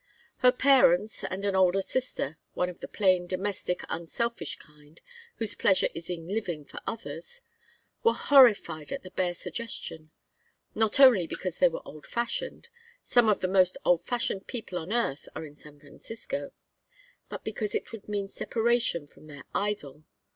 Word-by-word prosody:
Her 250 -1 +6
parents 250 -7 +4
and 195 +2 -4
an 200 -1 +1
older 190 +1 +4
sister 195 - -2 0.2
one 180 - 0
of 175 - -10
the - - -7
plain, 185 -3 +2
domestic, 185 -1 -2
unselfish 170 +1 -3
kind, 150 +1 -19 0.4
whose 225 -2 -3
pleasure 190 -2 +3
is 165 +1 -8
in 165 -2 -5
living 180 -7 -3
for - - -9
others 480 - -6 0.6
were 460 - +4
horrified 210 - +5
at - - -4
the 185 - -10
bare 180 -2 0
suggestion. 170 -7 -6 0.6
Not 220 +3 +1
only 240 -11 +7
because 185 0 -5
they 180 - +6
were 165 - -6
old 150 -1 -11
fashioned 235 - -3 0.4
some 240 -3 +4
of 210 - +2
the 185 - +1
most 185 -1 +3
old 175 -2 +4
fashioned 235 -5 -2
people 220 -7 -4
on 165 +4 -7
earth 230 - 0
are 160 - -5
in 145 -1 -12
San 150 -1 -15
Francisco 230 - -6 0.8
but - - -7
because 215 -1 -3
it - - -3
would 220 -2 -10
mean 200 -1 -1
separation 230 -6 0
from 150 +1 -18
their 145 -3 -10
idol. 200 -8 -3
190 Hz, 160 wpm, -28 LUFS, 170-230 Hz, 0.8 s, only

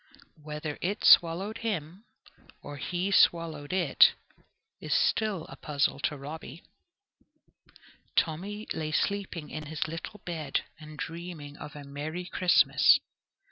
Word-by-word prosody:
Whether 150 0 -5
it 200 +4 -2
swallowed 185 +6 +5
him, 195 -2 -4 0.6
or 145 0 -8
he 180 +7 -2
swallowed 165 -6 +3
it, 185 -1 +5 0.7
is - - -1
still 215 - +1
a - - -10
puzzle 140 -2 -1
to 150 +1 -1
Robby. 150 +2 -8 1.5
Tommy 200 +7 -1
lay 155 -1 -3
sleeping 195 -6 -2
in 155 -1 -6
his 160 +1 -3
little 165 +6 -7
bed 160 -5 -2 0.2
and 155 -1 -11
dreaming 165 -4 -7
of 150 - -9
a 145 - -8
merry 150 +5 -5
Christmas. 180 0 +5
165 Hz, 120 wpm, -29 LUFS, 150-185 Hz, 1.5 s, swallowed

